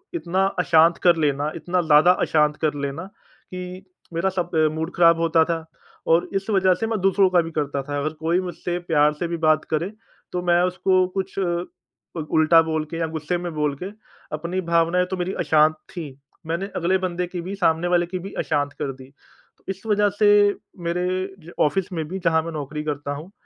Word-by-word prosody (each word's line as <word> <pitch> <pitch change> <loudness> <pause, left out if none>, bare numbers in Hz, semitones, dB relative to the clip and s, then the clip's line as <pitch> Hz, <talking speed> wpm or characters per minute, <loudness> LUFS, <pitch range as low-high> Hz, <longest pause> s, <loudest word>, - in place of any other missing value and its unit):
इतना 190 - 0
अशांत 165 0 +4
कर 175 -1 +6
लेना 145 +1 0
इतना 175 +2 -1
ज़्यादा 155 +2 +6
अशांत 150 -1 +2
कर 155 -2 +1
लेना 140 +4 -4
कि 185 -1 -11 0.3
मेरा 170 +4 +1
सब 180 -2 -3
अ, 155 -1 +4
मूड 160 +2 -3
ख़राब 170 -1 +5
होता 165 -1 +3
था 165 -1 -3 0.4
और 165 +1 +3
इस 195 +2 -2
वज़ह 190 -2 +4
से 225 - -3
मैं 220 -3 -1
दूसरों 195 0 +4
का 180 -2 +4
भी 165 - -6
करता 145 -3 -2
था। 145 +1 -4
अगर 155 +2 -1
कोई 165 +3 +1
मुझसे 175 0 -4
प्यार 150 -3 +2
से 160 +3 -3
भी 170 0 -3
बात 155 -1 +2
करे 170 +6 0 0.4
तो 180 - -2
मैं 175 0 +3
उसको 185 0 +2
कुछ 190 0 -3
उल 175 -2 -5
उल्टा 160 +1 +5
बोल 160 -1 -2
के 165 - -4
या 165 - 0
गुस्से 160 +2 -3
में 175 0 -5
बोल 150 -2 0
के - - -4 0.5
अपनी 170 +4 -3
भावनाएँ 170 +2 +3
तो 190 - -2
मेरी 180 +2 -2
अशांत 155 0 +4 0.2
थी 170 -4 -6 0.4
मैंने 170 +4 -2
अगले 185 +3 +1
बन्दे 180 -1 -2
की 175 -1 -5
भी 190 +3 -5
सामने 175 -2 +1
वाले 175 -1 +2
की 185 +1 -5
भी 195 +3 -8
अशांत 145 -1 -1
कर 135 - -2
दी। 130 0 -13 0.5
तो - - -33
इस 195 0 -4
वज़ह 205 -1 +3
से 210 -1 +5 0.6
मेरे 180 +1 -1 0.4
ज 170 - -11
ऑफ़िस 185 +5 +1
में 160 -2 -2
भी 190 +4 -5
जहाँ 160 -1 +3
मैं 165 - -5
नौकरी 150 0 -5
करता 145 -1 -3
हूँ 160 +7 -10
170 Hz, 205 wpm, -23 LUFS, 155-180 Hz, 0.6 s, कर